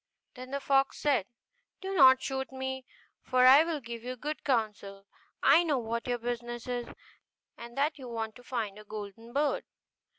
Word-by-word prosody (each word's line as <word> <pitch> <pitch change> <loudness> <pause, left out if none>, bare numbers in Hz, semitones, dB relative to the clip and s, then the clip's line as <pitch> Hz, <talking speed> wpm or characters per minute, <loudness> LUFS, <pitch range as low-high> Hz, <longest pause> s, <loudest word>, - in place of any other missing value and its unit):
Then 255 0 -9
the 280 +1 -2
fox 275 -1 +2
said, 265 -10 +1 0.5
'Do 385 +1 -4
not 260 -6 +7
shoot 265 -1 -3
me, 265 0 -5 0.3
for 255 0 +3
I 270 +4 +9
will 330 -2 -2
give 235 -2 -8
you 250 +1 -4
good 300 +5 -5
counsel; 210 -6 -2 0.4
I 290 +5 +7
know 305 -5 +1
what 230 0 -3
your 245 -1 0
business 240 0 -4
is, 245 -1 -3 0.7
and 235 +1 -11
that 295 +2 0
you 255 -2 -8
want 225 -2 -4
to 245 - -16
find 225 -6 -3
the - - -11
golden 215 +2 -8
bird. 285 +3 0
250 Hz, 175 wpm, -30 LUFS, 230-275 Hz, 0.7 s, I